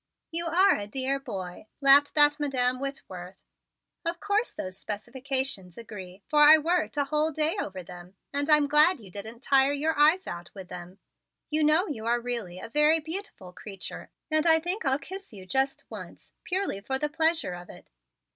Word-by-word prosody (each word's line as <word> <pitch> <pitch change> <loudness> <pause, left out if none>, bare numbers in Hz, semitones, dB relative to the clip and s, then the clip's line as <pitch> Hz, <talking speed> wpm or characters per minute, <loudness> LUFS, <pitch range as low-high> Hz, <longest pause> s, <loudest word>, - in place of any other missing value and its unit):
"You 335 +1 -1
are 370 +4 +4
a 205 - -5
dear 265 +4 -2
boy," 195 -7 -7
laughed 280 +1 +5
that 295 0 +5
Madam 255 -3 0
Whitworth. 190 -10 -6 0.7
"Of 335 0 -2
course 415 +3 0
those 185 0 -6
specifications 240 -2 -3
agree, 195 -4 -9
for 300 - +2
I 300 +1 +9
worked 330 0 0
a 285 - +3
whole 305 +2 0
day 310 +2 0
over 190 -2 -6
them; 180 +1 -12 0.2
and 285 +2 0
I'm 300 -1 +6
glad 300 +3 +4
you 200 -5 -14
didn't 220 +6 -8
tire 275 0 +4
your 310 +3 0
eyes 310 +6 +4
out 175 0 -7
with 190 -2 -9
them. 180 +2 -9 0.5
You 310 0 +2
know 310 +5 +4
you 225 -6 -5
are 240 +1 +2
really 235 -7 -4
a - - -7
very 300 +5 +4
beautiful 320 - -7
creature 195 0 -7 0.2
and 310 +1 +2
I 320 0 +6
think 355 +3 -3
I'll 265 0 +2
kiss 380 - -9
you 190 -3 -10
just 265 +7 -1
once, - - -10
purely 370 - -2
for 265 +6 -2
the 300 - -1
pleasure 320 - 0
of 175 0 -9
it." - - -14
275 Hz, 185 wpm, -27 LUFS, 205-310 Hz, 0.7 s, I